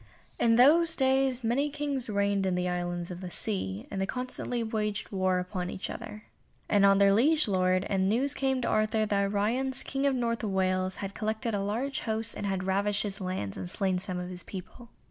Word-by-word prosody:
In 230 -1 +4
those 325 +7 +5
days 265 -1 +2
many 260 +6 +1
Kings 285 -4 -3
reigned 200 -1 +1
in 185 - +1
the 180 0 0
Islands 175 0 -2
of 180 +1 -7
the 180 - -5
Sea, 110 - -3
and 195 - -2
they 195 - 0
constantly 250 -1 -3
waged 210 -2 -2
war 185 -2 +1
upon 180 0 -3
each 190 - -5
other, 215 -2 -8 0.4
and 205 -1 +3
on 195 0 +6
their 200 0 +5
liege 300 +8 +3
lord, 185 -1 +2
and 190 -1 +1
news 265 +6 +1
came 265 -2 0
to - - 0
Arthur 215 0 +2
that 200 -1 +1
Ryons, 250 +6 0
King 275 +1 -1
of 275 - +2
North 230 -2 -1
Wales, 185 -2 0
had 195 0 -5
collected 220 +2 -2
a 205 - 0
large 230 +8 -2
host 220 0 -1
and 205 - -3
had 190 -1 -1
ravaged 200 +2 +1
his 205 -1 -4
lands 185 - -3
and 95 -2 -5
slain 190 - 0
some 185 0 -4
of 180 0 -5
his 180 0 -6
people. 205 +7 -9
205 Hz, 205 wpm, -29 LUFS, 185-240 Hz, 0.4 s, on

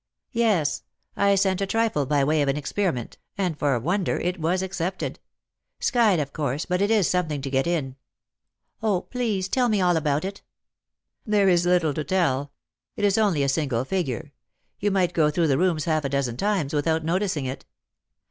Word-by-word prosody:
" - - -59
Yes. 215 - +1 0.3
I 200 0 +3
sent 190 -1 +1
a 195 - 0
trifle 220 - 0
by 145 0 +2
way 150 +2 +2
of 140 - +1
an 135 - 0
experiment; 150 - -2 0.2
and 185 -5 -1
for 145 -2 +1
a - - 0
wonder 180 - 0
it 180 +1 -2
was 175 +4 0
accepted. 185 0 -3 0.6
Skyed, 225 - +3
of 140 -2 -3
course, 145 0 -2
but 180 +1 -1
it 200 - +2
is 215 -5 +3
something 165 -5 0
to 135 - -4
get 135 +2 +1
in." 140 -6 -2 0.4
" - - -51
0, 205 -5 +1
please 220 -7 -2
tell 245 +4 +1
me 210 -2 +2
all 180 -2 +3
about 150 +1 0
it." 195 +1 -6 0.4
" - - -55
There 200 -2 +4
is 175 -1 +3
little 175 -4 +3
to 155 - -3
tell. 145 -6 0 0.4
It 205 - 0
is 200 +1 +3
only 190 -10 +2
a - - +1
single 135 -4 0
figure. 155 -5 -3 0.5
You 205 - +1
might 185 -3 +1
go 155 -3 +3
through 160 +1 +1
the 135 0 +2
rooms 170 -5 +1
half 155 -2 +1
a 140 - -1
dozen 135 -4 -1
times 195 -3 -1
without 160 +2 0
noticing 175 -4 0
it." 130 +1 -6
170 Hz, 200 wpm, -24 LUFS, 145-195 Hz, 0.6 s, There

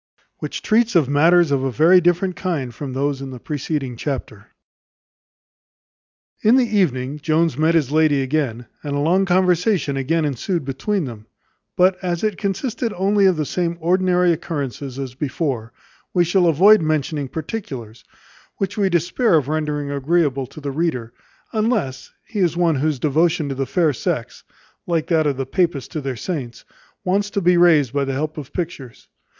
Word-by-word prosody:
Which - - -5
treats 230 0 +2
of 160 -6 +4
matters 165 +3 +4
of 135 -2 +1
a 135 - 0
very 170 +7 +5
different 175 +2 +1
kind 150 -10 -3
from 135 -1 -6
those 140 +1 -1
in 135 - -6
the 130 - -8
preceding 140 -2 -3
chapter. 115 -5 -5 1.9
In 220 +3 +5
the 260 -2 +4
evening 150 - 0
Jones 160 0 +1
met 160 +4 +2
his 145 -5 +1
lady 155 -3 +3
again, 130 -4 -2 0.2
and 145 -1 -4
a - - 0
long 180 +6 +2
conversation 180 -4 +2
again 155 +4 0
ensued 145 +3 -2
between 160 +7 -2
them: 110 -4 -9 0.5
but 185 +1 +4
as 175 0 -2
it 215 -3 -1
consisted 220 +4 -2
only 195 +1 +3
of 185 - +3
the 155 - -1
same 170 +2 -2
ordinary 180 +1 +2
occurrences 140 -5 -5
as 135 -3 -5
before, 130 -4 -3 0.4
we 175 - +5
shall 175 +1 +2
avoid 190 +6 +6
mentioning 155 -2 -1
particulars, 135 - -6 0.5
which 195 +1 -3
we 195 -2 +2
despair 175 +5 +2
of 145 -3 +1
rendering 150 -2 -2
agreeable 140 -2 0
to 140 - -12
the 140 -2 -4
reader; 135 -7 -2 0.4
unless 215 - -1 0.2
he 215 - -5
is 170 -3 +1
one 170 -4 +2
whose 150 +1 0
devotion 155 +3 +1
to - - -2
the 135 0 -3
fair 155 +2 +2
sex, - - -3 0.4
like 165 -3 0
that 160 -3 +2
of 140 -3 -1
the 135 - -2
papists 150 -3 -1
to 155 - -4
their 135 -2 -3
saints, 130 -7 -5 0.4
wants 200 +2 0
to 205 - -1
be 180 -1 +3
raised 160 -7 +4
by 140 -1 +1
the 135 0 -2
help 155 +3 -3
of 140 - -9
pictures. 160 -9 -6
155 Hz, 170 wpm, -20 LUFS, 135-180 Hz, 1.9 s, avoid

